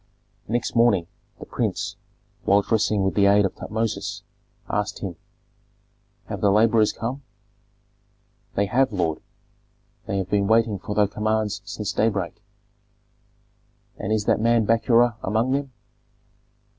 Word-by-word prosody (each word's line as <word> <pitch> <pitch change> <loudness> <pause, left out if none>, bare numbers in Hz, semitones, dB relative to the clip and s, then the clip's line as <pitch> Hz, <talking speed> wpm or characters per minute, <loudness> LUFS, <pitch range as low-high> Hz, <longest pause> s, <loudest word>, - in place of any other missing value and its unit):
Next 120 +2 -2
morning 115 -7 +4 0.3
the - - -8
prince, - - -2 0.5
while 100 +1 +4
dressing 105 -2 +1
with 95 - +1
the 100 -1 +4
aid 100 0 +5
of 95 - -2
Tutmosis, 105 -2 -3 0.4
asked 105 +1 -2
him, 95 -4 -5 1.1
"Have - - -6
the 100 - +4
laborers 110 +1 +4
come?" 125 +5 -5 1.3
"They 100 - +2
have, 130 +6 +2
lord; 85 -6 -1 0.9
they 100 - -1
have 95 -2 -2
been 100 -1 +2
waiting 110 -2 +2
for 105 +2 -5
thy 105 - +4
commands 110 0 -1
since 105 0 -4
daybreak." 100 -6 -1 1.6
"And 110 - -3
is 110 -1 +1
that - - +2
man 115 -1 +3
Bakura 115 +1 +3
among 110 +6 0
them?" 140 0 -1
105 Hz, 130 wpm, -24 LUFS, 100-115 Hz, 1.6 s, aid